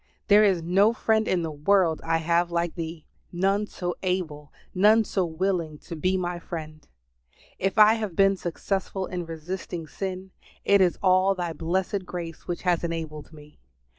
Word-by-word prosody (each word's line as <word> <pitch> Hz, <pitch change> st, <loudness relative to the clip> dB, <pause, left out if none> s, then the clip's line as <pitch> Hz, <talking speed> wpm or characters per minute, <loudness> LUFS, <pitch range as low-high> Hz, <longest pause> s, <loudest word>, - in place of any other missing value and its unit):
There 210 Hz, +1 st, +7 dB
is 190 Hz, -5 st, +2 dB
no 195 Hz, +6 st, +3 dB
friend 220 Hz, -1 st, +1 dB
in 180 Hz, -2 st, +1 dB
the 160 Hz, -, -3 dB
world 165 Hz, +2 st, +2 dB
I 165 Hz, 0 st, +1 dB
have 170 Hz, +2 st, +1 dB
like 170 Hz, -1 st, -1 dB
Thee; 165 Hz, -2 st, -6 dB, 0.3 s
none 195 Hz, +4 st, +1 dB
so 175 Hz, -3 st, -4 dB
able, 165 Hz, -6 st, -3 dB, 0.2 s
none 210 Hz, +4 st, +5 dB
so 195 Hz, -2 st, -1 dB
willing 165 Hz, -2 st, -2 dB
to 170 Hz, -, -9 dB
be 185 Hz, +4 st, 0 dB
my 175 Hz, -1 st, -3 dB
friend. 155 Hz, -2 st, -8 dB, 0.7 s
If 195 Hz, +2 st, -1 dB
I 215 Hz, 0 st, +8 dB
have 215 Hz, -6 st, -3 dB
been 195 Hz, +1 st, +4 dB
successful 190 Hz, +2 st, -3 dB
in 180 Hz, -2 st, -5 dB
resisting 165 Hz, +1 st, -6 dB
sin, 190 Hz, +3 st, -6 dB, 0.3 s
it 200 Hz, -1 st, +5 dB
is 180 Hz, -2 st, +3 dB
all 185 Hz, +1 st, +4 dB
Thy 175 Hz, -2 st, -3 dB
blessed 185 Hz, +4 st, -2 dB
grace 170 Hz, -3 st, -7 dB
which 175 Hz, -, -4 dB
has 175 Hz, -2 st, +1 dB
enabled 160 Hz, -3 st, -5 dB
me. 150 Hz, -1 st, -16 dB
180 Hz, 165 wpm, -26 LUFS, 165-195 Hz, 0.7 s, I